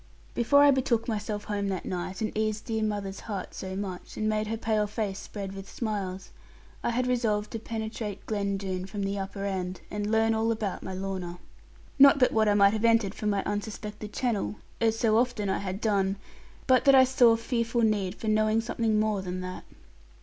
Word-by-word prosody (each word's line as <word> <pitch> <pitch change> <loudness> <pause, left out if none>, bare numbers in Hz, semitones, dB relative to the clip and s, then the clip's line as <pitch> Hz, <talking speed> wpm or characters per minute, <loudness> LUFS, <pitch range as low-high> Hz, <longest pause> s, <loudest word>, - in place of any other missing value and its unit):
Before 285 +5 +5
I 290 - +7
betook 255 -4 +1
myself 210 -2 -3
home 205 -1 -2
that 190 -2 -3
night, 185 +2 -4
and 215 - -2
eased 215 0 -1
dear 220 -1 -1
mother's 205 -2 -2
heart 200 -5 -5
so 190 0 -5
much, 190 -2 -6
and 215 - 0
made 215 0 0
her 225 +1 -2
pale 215 -2 0
face 205 -2 -3
spread 195 -2 -6
with 195 0 -9
smiles, 195 -5 -4 0.5
I - - +1
had 245 +2 0
resolved 225 -4 0
to 225 - -4
penetrate 220 -2 -5
Glen 200 -2 -1
Doone 190 -1 -4
from 200 0 -4
the 195 +1 -2
upper 195 +1 -4
end, 185 -2 -3
and 205 0 -2
learn 225 0 +3
all 225 +1 +1
about 215 -4 -2
my 190 - -6
Lorna. 185 -2 -4 0.6
Not 280 +1 +9
but 255 -2 +4
what 220 -1 +3
I 205 - +3
might 200 0 +5
have 220 0 -2
entered 230 -4 +3
from 210 - -2
my 200 -1 0
unsuspected 210 0 -5
channel, 220 -4 -1 0.3
as 225 -1 +2
so 225 -1 +3
often 235 -5 0
I - - 0
had 195 0 -4
done; 200 -3 +1 0.5
but 260 -1 +4
that 275 -1 +7
I 260 - +8
saw 250 -3 +5
fearful 230 0 -1
need 205 -4 +1
for 220 - -7
knowing 215 +1 +3
something 225 -1 0
more 215 -2 +1
than 185 0 -4
that. 185 0 -7
210 Hz, 200 wpm, -28 LUFS, 195-225 Hz, 0.6 s, Not